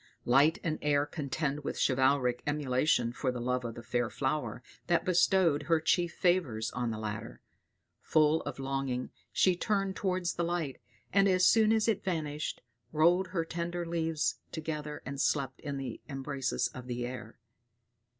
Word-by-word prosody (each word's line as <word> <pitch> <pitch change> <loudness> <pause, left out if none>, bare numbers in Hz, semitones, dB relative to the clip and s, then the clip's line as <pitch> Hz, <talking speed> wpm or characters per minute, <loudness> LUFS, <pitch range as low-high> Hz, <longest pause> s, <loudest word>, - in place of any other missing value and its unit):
Light 140 +6 +5
and 155 -2 -1
air 145 -1 +2
contend 150 -1 -3
with - - -3
chivalric 130 -2 +2
emulation 135 -4 +1
for 130 0 -1
the 125 - -5
love 125 +1 -1
of 115 -1 -5
the 120 - -9
fair 120 0 -1
flower 130 -4 -2 0.2
that 175 -1 +2
bestowed 180 -4 +3
her 165 +1 +2
chief 170 +2 +1
favors 140 -12 +1
on 125 -1 -2
the 110 - -3
latter; 105 -1 -5 0.6
full 155 +1 +3
of - - -6
longing 135 -2 -2 0.2
she 185 -1 +3
turned 195 +1 0
towards 185 -3 -1
the 170 - -2
light, 170 -5 -2 0.3
and 200 0 +5
as 185 -1 +4
soon 220 +1 +5
as 220 0 +2
it 220 -4 +1
vanished, 155 -5 -3 0.3
rolled 175 +4 +4
her 175 -3 -2
tender 170 +1 -3
leaves 165 -2 -1
together 150 -2 -5
and 140 +1 -3
slept 135 -3 0
in 140 -2 -4
the 130 -4 -5
embraces 135 -1 -1
of 125 -1 -10
the 120 -1 -3
air. 125 0 -7
150 Hz, 160 wpm, -31 LUFS, 130-170 Hz, 0.6 s, Light